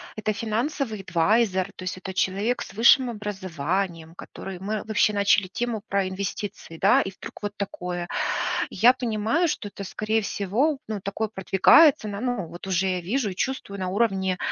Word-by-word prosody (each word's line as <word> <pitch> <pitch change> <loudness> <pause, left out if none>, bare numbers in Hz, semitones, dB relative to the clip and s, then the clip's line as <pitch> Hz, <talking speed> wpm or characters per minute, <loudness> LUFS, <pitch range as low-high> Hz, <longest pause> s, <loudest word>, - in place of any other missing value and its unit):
это 215 0 -1
финансовый 225 +1 -2
адвайзер, 190 +2 +1
то - - -9
есть 185 0 -4
это 190 0 -7
человек 205 +6 0
с - - -7
высшим 240 +3 +5
образованием, 185 -5 -3
который 190 0 -8
мы 205 +2 -3
вообще 215 -1 +2
начали 200 -1 +3
тему 225 +2 -3
про 200 -1 0
инвестиции, 190 -2 -5
да. 195 +5 +5
И 190 - -4
вдруг 195 - -11
вот 205 - -3
такое. 180 -3 -4 0.6
Я 235 +6 +6
понимаю, 245 +6 0
что 210 -8 -3
это, 200 - -8
скорее 215 +3 -1
всего, 225 +10 0
ну, 215 -2 -3
такое 200 +3 -3
продвигается 215 - +5
на, 200 -1 -5
ну, 245 -7 -2
вот 175 +3 -10
уже 190 0 +1
я 185 -1 -1
вижу 210 +4 -1
и - - -6
чувствую, 200 -2 -3
на 185 - -2
уровне 190 -2 0
200 Hz, 170 wpm, -25 LUFS, 190-225 Hz, 0.6 s, Я